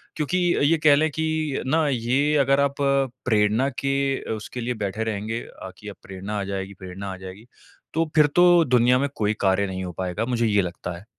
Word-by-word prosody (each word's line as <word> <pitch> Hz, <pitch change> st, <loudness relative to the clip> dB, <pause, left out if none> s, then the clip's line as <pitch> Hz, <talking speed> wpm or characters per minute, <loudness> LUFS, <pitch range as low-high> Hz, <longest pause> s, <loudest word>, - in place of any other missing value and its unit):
क्योंकि 175 Hz, +3 st, +1 dB
अ, -, -, 0 dB
ये 160 Hz, +3 st, +4 dB
कह 145 Hz, -2 st, +7 dB
लें 155 Hz, +2 st, +2 dB
कि 155 Hz, -2 st, -2 dB
ना, 155 Hz, +3 st, +2 dB
ये 135 Hz, +4 st, +1 dB
अगर 140 Hz, +1 st, +3 dB
आप 140 Hz, 0 st, +1 dB
प्रेरणा 125 Hz, -3 st, +1 dB
के 135 Hz, 0 st, 0 dB, 0.3 s
अ, -, -, -6 dB
उसके 110 Hz, +3 st, -6 dB
लिए 125 Hz, +1 st, -2 dB
बैठे 105 Hz, +3 st, -3 dB
रहेंगे 110 Hz, +1 st, -3 dB
अ, -, -, -11 dB
कि -, -, -12 dB
अब -, -, -9 dB
प्रेरणा 95 Hz, +2 st, -5 dB
आ -, -, -2 dB
जाएगी, 95 Hz, 0 st, -4 dB
प्रेरणा 95 Hz, +1 st, -7 dB
आ -, -, -8 dB
जाएगी, 95 Hz, +4 st, -10 dB, 0.5 s
तो 165 Hz, 0 st, 0 dB
फिर 150 Hz, -1 st, +6 dB
तो 175 Hz, -1 st, +6 dB
दुनिया 125 Hz, 0 st, +4 dB
में 140 Hz, 0 st, 0 dB
कोई 105 Hz, 0 st, 0 dB
कार्य 95 Hz, 0 st, +2 dB
नहीं 95 Hz, 0 st, -4 dB
हो 90 Hz, -, -5 dB
पाएगा, 95 Hz, +4 st, -2 dB
मुझे 120 Hz, -2 st, 0 dB
ये 105 Hz, -1 st, +3 dB
लगता 90 Hz, -1 st, -5 dB
है। 100 Hz, -, -14 dB
120 Hz, 215 wpm, -24 LUFS, 100-145 Hz, 0.5 s, कह